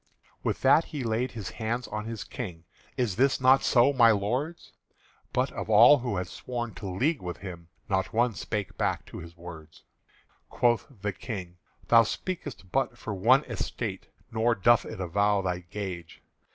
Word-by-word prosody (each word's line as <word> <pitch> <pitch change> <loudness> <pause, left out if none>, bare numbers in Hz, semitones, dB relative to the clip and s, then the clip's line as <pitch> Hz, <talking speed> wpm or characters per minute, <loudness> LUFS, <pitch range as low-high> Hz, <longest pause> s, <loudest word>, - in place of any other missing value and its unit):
With - - -2
that 145 +5 +5
he 145 -5 -5
laid 115 +2 -1
his 105 -5 -6
hands 120 +2 -3
on 105 0 -4
his 115 -2 -5
King: 90 -9 -7 0.3
"Is 115 -7 0
this 135 +2 +3
not 130 +1 +5
so, 125 +3 +4
my 120 -3 +6
lords?" 125 +11 -1 0.6
But - - 0
of - - -6
all 120 +7 +8
who 120 -5 -2
had 90 - -1
sworn 120 0 -5
to 95 +2 -6
league 135 - 0
with 90 -1 -5
him 85 -4 -9 0.2
Not 95 -1 0
one 120 +1 +2
spake 105 -1 -4
back - - 0
to - - -9
his 85 +1 -11
words. 80 -2 -11 0.7
Quoth 120 -2 +1 0.2
the 105 -1 -1
King: 95 -5 -7 0.3
"Thou 115 -1 +8
speak'st 120 - -5
but 135 -2 0
for 110 - -5
one 120 +9 +4
Estate, 115 -8 -4 0.2
Nor 115 +1 +2
doth 115 +1 +4
it - - -7
avow 100 +3 +1
thy 90 -1 -1
gage. 90 -2 -7
110 Hz, 170 wpm, -28 LUFS, 95-125 Hz, 0.7 s, all